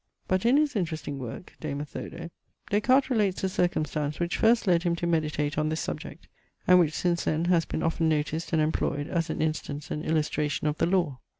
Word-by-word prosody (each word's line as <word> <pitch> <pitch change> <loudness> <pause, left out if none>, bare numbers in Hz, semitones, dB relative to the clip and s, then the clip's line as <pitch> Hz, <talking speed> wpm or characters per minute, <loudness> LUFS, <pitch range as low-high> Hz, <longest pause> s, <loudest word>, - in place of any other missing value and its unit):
But, 185 +4 +1
in 255 +4 +5
his 295 -4 +2
interesting 160 -7 -3
work, 125 +6 -7
De 155 -2 -4
Methodo, 150 +3 -6 0.4
Des 205 +1 +3
Cartes 265 +4 +3
relates 205 -6 +1
the 190 - +2
circumstance 155 -5 -1
which 175 0 -1
first 230 +1 +3
led 175 -3 +3
him 170 -1 +1
to 170 - -3
meditate 155 -3 0
on 155 0 +1
this 160 +1 -2
subject, - - -6 0.4
and 180 0 +7
which 160 -3 +2
since 175 -1 0
then 160 +2 +1
has 175 -2 +3
been - - -3
often 165 0 +1
noticed 155 +1 -1
and 160 -2 +3
employed 145 -2 -1
as 165 -2 -1
an 155 - -1
instance 150 -2 -3
and 150 - -3
illustration 150 -2 0
of 150 0 0
the - - +3
law. 170 -8 +1
165 Hz, 205 wpm, -27 LUFS, 150-180 Hz, 0.4 s, and